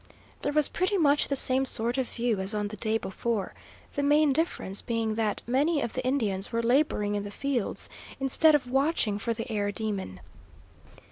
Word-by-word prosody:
There - - -1
was 300 -1 +3
pretty 370 +3 0
much 295 -4 +3
the 280 - -1
same 265 0 +3
sort 240 0 0
of 260 - -2
view 235 -4 -1
as 190 +3 -1
on 210 -1 -2
the 215 - -7
day 220 +2 0
before, 225 0 -3 0.4
the 285 - -1
main 295 0 +4
difference 265 - 0
being 230 -2 -1
that 215 -2 -1
many 285 +6 +1
of 235 - -3
the 255 - -3
Indians 215 -8 -1
were 230 0 -1
labouring 235 -5 +1
in 205 - -1
the 205 - -6
fields, 250 0 -2 0.3
instead 295 +4 +5
of 255 -4 -2
watching 270 -7 +1
for 230 +2 -2
the 225 +2 -5
air 205 -1 -1
demon. 200 - -4
235 Hz, 190 wpm, -27 LUFS, 210-280 Hz, 0.4 s, instead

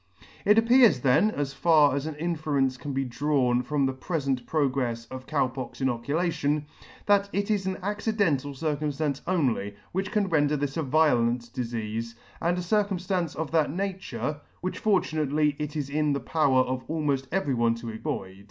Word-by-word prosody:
It 210 +2 +5
appears 230 - +5
then 135 +12 +4
(as 145 -8 -3
far 150 -1 +4
as 140 +2 -2
an 160 - -5
inference 150 -5 0
can 140 +3 -6
be 135 0 -1
drawn 125 -1 +1
from 140 +2 0
the 135 - 0
prefent 135 -3 -2
progrefs 130 -6 0
of 130 0 -8
Cow 140 -4 +1
pox 130 -1 -7
inoculation) 145 +4 0 0.4
that 200 -1 +3
it 200 +1 -1
is 200 -3 0
an 190 - -2
accidental 200 - 0
circumftance 150 0 -2
only, 125 - 0 0.2
which 190 +2 -2
can 210 -2 +1
render 150 -3 +2
this 145 -1 -2
a 165 - 0
violent 125 -5 +2
difeafe, 115 -1 -4 0.3
and 175 +2 +1
a - - -1
circumftance 185 -3 0
of 160 -2 -4
that 160 -2 +2
nature) 155 - -3 0.2
which 185 - -3
fortunately 155 -7 +1
it 150 0 -4
is 145 -3 -2
in 150 +1 +1
the 140 - -1
power 135 -1 +2
of 130 0 -3
almoft 145 -4 -1
every 165 -7 0
one 115 -1 +2
to 115 0 -6
avoid. 95 -3 -5
145 Hz, 170 wpm, -27 LUFS, 130-170 Hz, 0.4 s, It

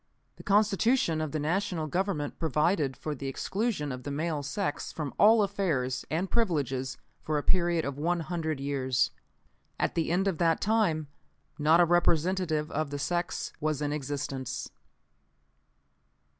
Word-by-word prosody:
The - - -11
Constitution 205 -3 +3
of 155 -2 -2
the 155 - -1
National 165 +2 -1
Government 170 -2 -2
provided 150 -3 +1
for 155 - -3
the 140 -1 -5
exclusion 190 - -2
of 125 0 -5
the 145 - -6
male 155 +1 -1
sex 145 +3 -3
from 150 -3 -4
all 215 +1 +7
affairs 155 -11 -1
and 170 +5 0
privileges 140 - 0 0.2
for 155 -1 -1
a 145 - -1
period 170 -2 +2
of 140 0 -4
one 170 +2 +1
hundred 160 -3 -2
years. 135 -3 0 0.7
"_At - - +1
the 165 - 0
end 190 +3 +2
of 185 -5 -1
that 165 -2 +3
time 200 -8 +1 0.5
not 155 +3 +5
a 175 - +7
representative 170 -2 +1
of 155 -1 -1
the 145 - -4
sex 175 +5 -2
was 155 -1 0
in 145 0 -1
existence. 135 -3 -4
155 Hz, 150 wpm, -29 LUFS, 145-180 Hz, 0.7 s, all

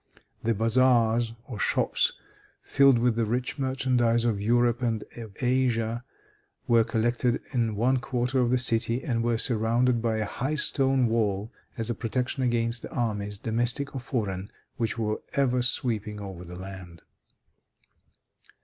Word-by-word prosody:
The 115 0 0
bazaars 115 0 +3
or 120 -7 -7
shops, - - +1 0.5
filled 140 -3 +4
with 120 -1 +2
the 115 -1 +1
rich 125 +6 -2
merchandise 125 -3 +1
of 110 -4 0
Europe 120 +2 +2
and 115 -3 -1
of 110 -4 -9
Asia, 120 -2 +1 0.6
were 115 -1 +5
collected 120 +2 0
in 115 -4 0
one 125 +5 +2
quarter 125 0 -1
of 125 -1 +2
the 125 - +3
city, 120 0 +1
and 120 -7 -1
were 120 -1 +1
surrounded 115 +1 +1
by 115 -1 0
a 110 - -1
high 135 +8 -3
stone 135 -3 +2
wall 110 -2 0 0.3
as 115 0 0
a - - 0
protection 125 +4 -2
against 120 -1 0
the - - -8
armies, 105 -4 -2
domestic 120 +6 -1
or 135 - -3
foreign, 105 -7 -3 0.3
which 115 0 -1
were 110 -1 -2
ever 125 -3 +2
sweeping 110 -4 -1
over 95 -3 -7
the 90 0 -9
land. 95 -3 -9
115 Hz, 150 wpm, -27 LUFS, 110-125 Hz, 0.6 s, were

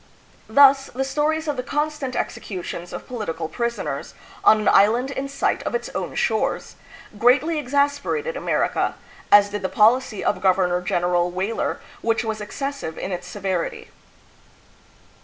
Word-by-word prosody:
Thus 270 +3 +6
the 265 - -3
stories 300 +4 0
of 295 -2 -1
the - - 0
constant 295 -1 -2
executions 180 -2 -5
of - - -7
political 170 -10 -4
pris 235 +6 -2
oners, - - -5 0.3
on 215 - +6
an 215 - -2
island 235 +7 +4
in 275 0 -4
sight 280 - 0
of - - -3
its 475 - -3
own - - -4
shores, - - -1 0.4
greatly 285 +7 +3
exasperated 285 - 0
America, - - 0 0.4
as 205 0 +7
did 205 -1 -3
the 190 - -2
policy 220 0 +3
of - - 0
Governor 180 -2 +2
gen 175 -1 -1
eral 175 0 +2
Weyler, 190 +5 -2 0.2
which 230 0 +1
was 220 -1 -3
excessive 275 - -5
in 195 - -4
its 180 0 -5
severity. 190 -4 -3
235 Hz, 150 wpm, -22 LUFS, 190-280 Hz, 0.4 s, as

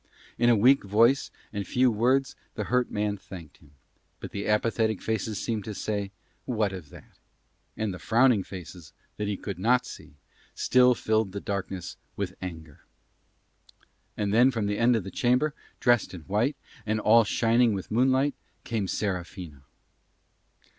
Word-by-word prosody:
In 120 0 +4
a 120 - +6
weak 125 +6 +5
voice 115 +7 +3 0.2
and 100 -2 -4
few 125 0 +3
words 130 +5 +1 0.2
the - - -2
hurt 125 0 +1
man 105 0 -1
thanked 90 -5 -11
him, 75 - -21 0.5
but - - -8
the 100 - -4
apathetic 110 0 +1
faces 110 -1 -2
seemed 110 -3 -2
to 110 - -6
say 100 -1 -3 0.4
What 110 -5 0
of 90 -6 -8
that? - - -16 0.6
And 110 -3 -2
the 90 - -8
frowning 115 -2 +3
faces 85 -3 -10 0.2
that 105 - -2
he 100 -1 -2
could 95 -1 -6
not 125 +5 +3
see 75 - -11 0.4
still 125 -1 +4
filled 110 -3 0
the 100 - -3
darkness 95 -2 -5 0.2
with 95 -2 -3
anger. 80 -5 -8 1.4
And 100 -1 -1
then 120 +4 +6
from 115 -5 -2
the 105 0 -1
end 120 +1 +4
of 110 - -1
the 95 - -7
chamber, 125 +5 +1 0.3
dressed 120 -6 +2
in 85 - -9
white, 105 - 0 0.3
and 110 0 -1
all 115 +2 +5
shining 115 +2 +2
with 95 - -7
moonlight, 130 +4 +2 0.3
came 110 -4 -2
Serafina. 90 -8 -4
110 Hz, 160 wpm, -27 LUFS, 95-120 Hz, 1.4 s, a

